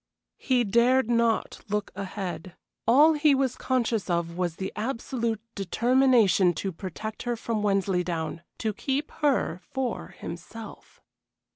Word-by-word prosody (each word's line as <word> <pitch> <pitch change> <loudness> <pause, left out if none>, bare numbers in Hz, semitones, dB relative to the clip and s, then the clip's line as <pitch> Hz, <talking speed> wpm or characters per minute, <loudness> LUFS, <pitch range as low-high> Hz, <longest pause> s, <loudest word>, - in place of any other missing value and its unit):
He 255 -3 +2
dared 240 +3 +3
not 235 -1 +1
look 210 0 -1
ahead. 185 -3 -5 0.3
All 290 +7 +7
he 300 -1 +4
was 265 -2 0
conscious 235 -6 0
of 170 -1 -1
was 175 -2 -1
the 190 +2 -5
absolute 230 -1 -2
determination 225 -3 +3
to 195 +4 -2
protect 190 +5 -6
her 240 -1 -1
from 225 -1 -2
Wensleydown 180 -5 0 0.2
to 220 -2 -1
keep 275 +8 -2
her 265 - 0
for 260 -3 -2
himself. 195 +6 -10
220 Hz, 125 wpm, -27 LUFS, 185-255 Hz, 0.3 s, All